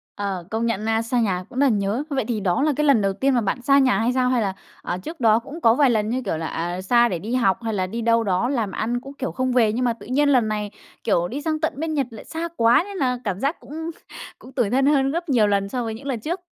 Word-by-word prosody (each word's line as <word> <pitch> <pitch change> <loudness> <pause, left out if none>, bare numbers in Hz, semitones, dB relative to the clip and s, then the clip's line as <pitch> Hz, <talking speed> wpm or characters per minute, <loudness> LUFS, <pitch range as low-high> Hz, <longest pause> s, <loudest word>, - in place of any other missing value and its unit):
Ờ, 195 -3 -3
công 225 +1 -1
nhận 220 -2 -1
na, 225 0 +1
xa 230 +2 -1
nhà 190 -5 0
cũng 255 - -5
rất 285 - +5
là - - +4
nhớ. 210 +4 0
Vậy 265 -5 -1
thì 235 -3 -1
đó 185 0 0
là 305 0 +2
cái 300 - 0
lần 275 -7 +5
đầu 195 -1 +1
tiên 265 +7 +1
mà 245 - +2
bạn 210 +4 -2
xa 275 +3 +4
nhà 265 -2 +3
hay 235 +3 +1
sao? 255 0 +2
Hay 250 -2 +2
là, 195 -3 -1 0.3
à, 175 - -3
trước 320 - -8
đó 225 -2 +4
cũng 285 +8 -10
có 225 -5 +5
vài 275 -1 +4
lần, 215 -2 +1
như 255 +3 -1
kiểu 175 - -1
là, 160 0 -3
à, 175 +2 -3
xa 240 +5 +4
để 175 - -2
đi 225 +8 -3
học 195 -7 +2
hay 225 -1 -2
là 185 -2 -1
đi 230 +5 -4
đâu 230 0 +3
đó 195 +4 0
làm 230 -8 -1
ăn, 240 +5 -2
cũng, 275 +2 -10
kiểu, 270 -2 -4
không 260 0 -1
về? 225 -4 +3
Nhưng 250 +2 0
mà 240 - +2
tự 230 - -14
nhiên 285 +5 +2
lần 250 -5 +3
này, 210 -1 -3 0.3
kiểu, 175 -5 +1
đi 275 +9 -5
sang 310 0 -1
tận 315 - 0
bên 315 +1 -2
Nhật 280 -4 0
lại 220 - -10
xa 330 +1 -4
quá, 230 +6 +5
nên 400 -1 -7
là 250 -5 0
cảm 200 -4 -2
giác 280 +7 -1
cũng 320 +3 -6 0.5
cũng 255 - -13
tủi 245 -6 0
thân 265 +4 +2
hơn 275 -2 +3
gấp 340 +2 -3
nhiều 230 -6 +4
lần 200 -1 0
so 245 +3 -2
với 225 -1 -3
những 230 +6 -9
lần 255 -4 -2
trước? 335 - -3
235 Hz, 305 wpm, -22 LUFS, 210-270 Hz, 0.5 s, rất